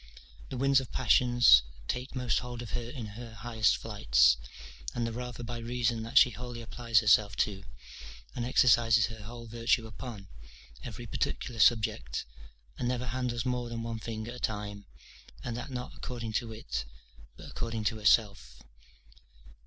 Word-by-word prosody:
The 130 Hz, -, -5 dB
winds 135 Hz, +1 st, +4 dB
of 130 Hz, -, -7 dB
passions 120 Hz, -, +6 dB, 0.3 s
take 125 Hz, +3 st, -3 dB
most 125 Hz, -3 st, +1 dB
hold 120 Hz, -1 st, -6 dB
of 115 Hz, -, -9 dB
her 115 Hz, +3 st, -3 dB
in 125 Hz, -3 st, -6 dB
her 110 Hz, +2 st, -9 dB
highest 110 Hz, 0 st, +1 dB
flights; 65 Hz, -, +4 dB, 0.6 s
and 120 Hz, -, 0 dB
the 115 Hz, -, -2 dB
rather 120 Hz, 0 st, -6 dB
by 120 Hz, 0 st, -5 dB
reason 120 Hz, -1 st, -1 dB
that 115 Hz, +4 st, -2 dB
she 125 Hz, -, +8 dB
wholly 120 Hz, +1 st, -7 dB
applies 115 Hz, -1 st, +1 dB
herself 105 Hz, -2 st, +4 dB
to, 100 Hz, -2 st, -8 dB, 0.7 s
and 120 Hz, -, -2 dB
exercises 115 Hz, -3 st, +5 dB
her 110 Hz, -1 st, -8 dB
whole 115 Hz, +2 st, -9 dB
virtue 115 Hz, 0 st, +1 dB
upon, 110 Hz, -3 st, -8 dB, 0.6 s
every -, -, -7 dB
particular 120 Hz, -2 st, -3 dB
subject, 100 Hz, -, +2 dB, 0.5 s
and 120 Hz, -, -1 dB
never 125 Hz, 0 st, -1 dB
handles 125 Hz, 0 st, -2 dB
more 125 Hz, -1 st, -1 dB
than 115 Hz, -1 st, -4 dB
one 115 Hz, -1 st, -4 dB
thing 110 Hz, 0 st, -5 dB
at 120 Hz, -, -6 dB
a 125 Hz, -, -9 dB
time, 105 Hz, -3 st, -4 dB, 0.6 s
and 120 Hz, -, -4 dB
that 120 Hz, +4 st, -5 dB
not 125 Hz, -1 st, -5 dB
according 115 Hz, -3 st, -6 dB
to 115 Hz, 0 st, -1 dB
it, 60 Hz, -, -4 dB, 0.5 s
but -, -, -11 dB
according 115 Hz, -1 st, -3 dB
to 110 Hz, +1 st, 0 dB
herself. 100 Hz, -, +2 dB
115 Hz, 160 wpm, -30 LUFS, 110-120 Hz, 0.7 s, she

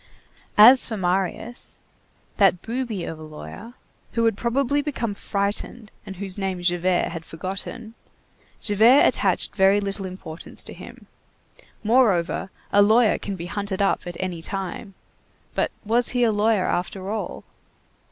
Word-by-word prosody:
As 245 Hz, +5 st, +9 dB
for 220 Hz, -, -4 dB
Marius, 190 Hz, +6 st, -2 dB, 0.6 s
"that 190 Hz, -3 st, +4 dB
booby 230 Hz, -5 st, -3 dB
of 160 Hz, -1 st, -6 dB
a -, -, -9 dB
lawyer," 155 Hz, +10 st, -10 dB, 0.4 s
who 230 Hz, -1 st, +1 dB
had 225 Hz, -, +2 dB
probably 270 Hz, +5 st, 0 dB
become 255 Hz, -7 st, -3 dB
frightened, 205 Hz, +3 st, -3 dB, 0.2 s
and 195 Hz, -, -7 dB
whose 195 Hz, +1 st, -6 dB
name 190 Hz, -2 st, -2 dB
Javert 175 Hz, 0 st, +1 dB
had 165 Hz, -, -6 dB
forgotten, 195 Hz, +8 st, -7 dB, 0.7 s
Javert 225 Hz, +6 st, +5 dB
attached -, -, +1 dB
very 195 Hz, +1 st, +4 dB
little 195 Hz, -1 st, -3 dB
importance 180 Hz, -3 st, -8 dB
to -, -, -10 dB
him. -, -, -12 dB, 0.8 s
Moreover, 210 Hz, -7 st, +2 dB, 0.2 s
a 205 Hz, -, +6 dB
lawyer 220 Hz, +2 st, +4 dB
can 200 Hz, -, -4 dB
be 170 Hz, -2 st, -6 dB
hunted 200 Hz, +1 st, -4 dB
up 195 Hz, -, 0 dB
at 175 Hz, -1 st, -6 dB
any 180 Hz, -3 st, -3 dB
time. 195 Hz, +2 st, -5 dB, 0.6 s
But -, -, 0 dB, 0.2 s
was 235 Hz, +3 st, +2 dB
he 245 Hz, -, +3 dB
a 230 Hz, -, +4 dB
lawyer 210 Hz, -2 st, +2 dB
after 190 Hz, +2 st, -2 dB
all? 220 Hz, -1 st, -4 dB
200 Hz, 140 wpm, -23 LUFS, 185-225 Hz, 0.8 s, As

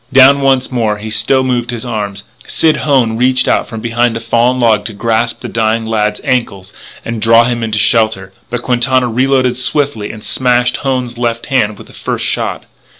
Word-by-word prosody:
Down 135 Hz, +1 st, +6 dB
once 135 Hz, -1 st, +1 dB
more, 110 Hz, -4 st, 0 dB
he 110 Hz, +1 st, -7 dB
still 130 Hz, +4 st, +2 dB
moved 125 Hz, -2 st, -1 dB
his 120 Hz, 0 st, -5 dB
arms. 100 Hz, -4 st, -4 dB, 0.2 s
Sid 160 Hz, -1 st, +2 dB
Hone 130 Hz, -7 st, +1 dB
reached 130 Hz, +1 st, +2 dB
out -, -, +1 dB
from 110 Hz, -2 st, -7 dB
behind 120 Hz, 0 st, 0 dB
a -, -, -4 dB
fallen 120 Hz, +2 st, +1 dB
log 115 Hz, -4 st, +2 dB
to 110 Hz, -, -5 dB
grasp 115 Hz, +2 st, -1 dB
the -, -, -6 dB
dying 110 Hz, 0 st, -1 dB
lad's 105 Hz, -1 st, -1 dB
ankle 115 Hz, -7 st, -1 dB, 0.4 s
and 115 Hz, -2 st, -4 dB
draw 115 Hz, +1 st, +5 dB
him 120 Hz, 0 st, -2 dB
into 110 Hz, -2 st, -2 dB
shelter, 105 Hz, -3 st, +1 dB, 0.2 s
but 120 Hz, 0 st, -4 dB
Quintana 125 Hz, +1 st, +1 dB
reloaded 130 Hz, +1 st, +1 dB
swiftly 130 Hz, -5 st, -1 dB
and 110 Hz, -1 st, -11 dB
smashed 125 Hz, -1 st, +1 dB
Hone's 125 Hz, -3 st, -3 dB
left 115 Hz, -1 st, -2 dB
hand 110 Hz, -7 st, 0 dB
with -, -, -12 dB
the -, -, -17 dB
first -, -, -3 dB
shot. -, -, -2 dB
120 Hz, 190 wpm, -13 LUFS, 110-130 Hz, 0.4 s, Down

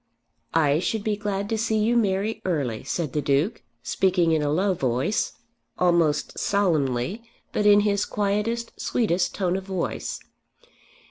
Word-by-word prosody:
"I 150 Hz, -2 st, +3 dB
should 210 Hz, +4 st, -1 dB
be 215 Hz, -1 st, 0 dB
glad 200 Hz, -1 st, -3 dB
to 225 Hz, -1 st, -1 dB
see 220 Hz, 0 st, +1 dB
you 220 Hz, +3 st, +2 dB
marry 215 Hz, 0 st, 0 dB
early," 140 Hz, -11 st, -1 dB
said 160 Hz, -6 st, -3 dB
the 150 Hz, -, 0 dB
Duke, 145 Hz, -, +1 dB, 0.2 s
speaking 180 Hz, -3 st, +2 dB
in 160 Hz, -1 st, +2 dB
a 145 Hz, -, 0 dB
low 190 Hz, +5 st, +2 dB
voice, 130 Hz, -, 0 dB, 0.4 s
almost 170 Hz, -4 st, +2 dB
solemnly, 160 Hz, -, 0 dB, 0.3 s
but 210 Hz, -, +2 dB
in 205 Hz, 0 st, +7 dB
his 205 Hz, -1 st, +1 dB
quietest, 210 Hz, +3 st, -1 dB
sweetest 185 Hz, -7 st, 0 dB
tone 185 Hz, -2 st, 0 dB
of 190 Hz, 0 st, -4 dB
voice. 190 Hz, -3 st, -3 dB
190 Hz, 145 wpm, -25 LUFS, 155-210 Hz, 0.4 s, in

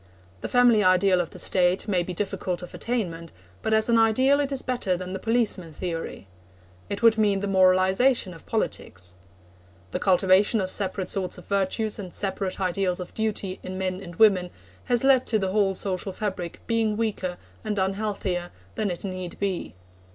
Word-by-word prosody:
The -, -, -4 dB
family 245 Hz, -4 st, +5 dB
ideal 185 Hz, 0 st, +4 dB
of 170 Hz, -, -5 dB
the -, -, -12 dB
State 180 Hz, +2 st, +1 dB
may 185 Hz, -4 st, +2 dB
be 175 Hz, -, -4 dB
difficult 180 Hz, -1 st, -3 dB
of 180 Hz, -, -9 dB
attainment, 170 Hz, -9 st, -3 dB, 0.3 s
but 220 Hz, -, -2 dB
as 220 Hz, 0 st, +3 dB
an 230 Hz, -1 st, +4 dB
ideal 255 Hz, +6 st, +4 dB
it 285 Hz, -1 st, -1 dB
is 270 Hz, -1 st, -2 dB
better 240 Hz, -8 st, -1 dB
than 185 Hz, +1 st, -6 dB
the 190 Hz, -, -4 dB
policeman 215 Hz, -7 st, 0 dB
theory. 165 Hz, -, -5 dB, 0.6 s
It 200 Hz, +3 st, -4 dB
would 225 Hz, -1 st, +5 dB
mean 205 Hz, -2 st, +3 dB
the 200 Hz, -, -3 dB
moralisation 190 Hz, +4 st, +3 dB
of 165 Hz, -, -15 dB
politics. 90 Hz, -, -3 dB, 0.8 s
The -, -, -2 dB
cultivation 190 Hz, +3 st, +3 dB
of 190 Hz, -1 st, -2 dB
separate 190 Hz, -2 st, -1 dB
sorts 185 Hz, -2 st, -1 dB
of -, -, -12 dB
virtues 200 Hz, +2 st, -1 dB
and 185 Hz, -3 st, -7 dB
separate 190 Hz, -1 st, -3 dB
ideals 185 Hz, -1 st, 0 dB
of 180 Hz, -, -7 dB
duty 210 Hz, -4 st, -2 dB
in 185 Hz, 0 st, -6 dB
men 185 Hz, 0 st, -2 dB
and 175 Hz, -3 st, -9 dB
women 190 Hz, -4 st, +4 dB, 0.4 s
has 245 Hz, -1 st, +1 dB
led 270 Hz, -2 st, +4 dB
to 220 Hz, -, +2 dB
the 190 Hz, -2 st, -1 dB
whole 195 Hz, -1 st, +2 dB
social 190 Hz, 0 st, -3 dB
fabric 185 Hz, -4 st, -4 dB
being 225 Hz, -2 st, 0 dB
weaker 195 Hz, -5 st, -2 dB, 0.3 s
and 215 Hz, -2 st, -2 dB
unhealthier 190 Hz, -2 st, -1 dB, 0.2 s
than 215 Hz, -2 st, -1 dB
it 175 Hz, +2 st, -4 dB
need 185 Hz, -2 st, -5 dB
be. 190 Hz, -, -3 dB
195 Hz, 180 wpm, -25 LUFS, 185-220 Hz, 0.8 s, family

